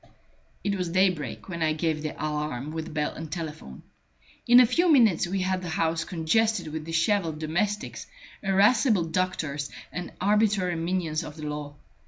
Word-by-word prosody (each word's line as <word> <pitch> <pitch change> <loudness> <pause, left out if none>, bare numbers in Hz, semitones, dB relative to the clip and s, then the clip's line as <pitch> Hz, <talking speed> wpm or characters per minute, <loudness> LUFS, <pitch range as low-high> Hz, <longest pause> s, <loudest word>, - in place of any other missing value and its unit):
It 200 - 0
was 180 -3 -2
daybreak 185 -4 0
when 170 -3 -5
I 155 -1 +2
gave 155 -1 -1
the 155 - -2
alarm 150 -2 -3
with 160 0 -5
bell 150 -1 -1
and 160 -1 -8
telephone. 155 - -6 0.6
In 245 +1 +8
a 250 - +8
few 335 +9 +3
minutes 220 - +4
we 190 +2 -1
had 185 0 0
the 180 - -5
house 165 +1 0
congested 190 +2 +1
with 155 0 -5
dishevelled 165 0 +1
domestics, 175 +7 -2 0.3
irascible 205 +1 +4
doctors, 160 -4 -2 0.2
and 180 0 -5
arbitrary 200 -2 +2
minions 165 -2 -1
of 150 - -8
the 155 - -9
law. 150 -1 -5
170 Hz, 160 wpm, -26 LUFS, 155-195 Hz, 0.6 s, In